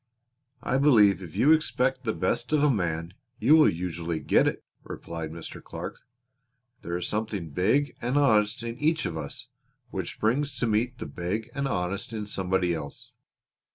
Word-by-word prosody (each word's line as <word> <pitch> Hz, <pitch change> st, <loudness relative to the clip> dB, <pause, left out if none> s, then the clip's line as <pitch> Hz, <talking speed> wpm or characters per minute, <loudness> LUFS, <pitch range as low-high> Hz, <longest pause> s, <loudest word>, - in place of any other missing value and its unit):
"I 130 Hz, -, +1 dB
believe 110 Hz, -9 st, +5 dB
if 85 Hz, -4 st, -9 dB
you 150 Hz, -, +4 dB
expect 130 Hz, -4 st, +2 dB
the 110 Hz, -, +1 dB
best 120 Hz, -, -1 dB
of 150 Hz, -1 st, +3 dB
a 150 Hz, -, +5 dB
man 85 Hz, -5 st, -2 dB, 0.2 s
you 155 Hz, -, +5 dB
will 155 Hz, -1 st, +7 dB
usually 85 Hz, -1 st, -3 dB
get 75 Hz, -, +3 dB
it," -, -, -2 dB, 0.2 s
replied 85 Hz, -1 st, -6 dB
Mr. 80 Hz, 0 st, -8 dB
Clark. -, -, -7 dB, 0.8 s
"There 85 Hz, +1 st, -3 dB
is 90 Hz, -, -3 dB
something 105 Hz, -6 st, -3 dB
big 110 Hz, -, +1 dB
and 125 Hz, +4 st, 0 dB
honest 110 Hz, -6 st, +3 dB
in 115 Hz, +1 st, -5 dB
each 155 Hz, +1 st, +1 dB
of 80 Hz, -, -3 dB
us 80 Hz, -, -6 dB, 0.4 s
which 95 Hz, -4 st, -4 dB
springs 140 Hz, +7 st, 0 dB
to -, -, 0 dB
meet 120 Hz, +3 st, 0 dB
the -, -, -6 dB
big 105 Hz, +7 st, -4 dB
and 140 Hz, 0 st, -1 dB
honest 100 Hz, -1 st, -2 dB
in 105 Hz, -2 st, -3 dB
somebody 95 Hz, -3 st, 0 dB
else. 75 Hz, -4 st, -7 dB
105 Hz, 170 wpm, -27 LUFS, 85-130 Hz, 0.8 s, will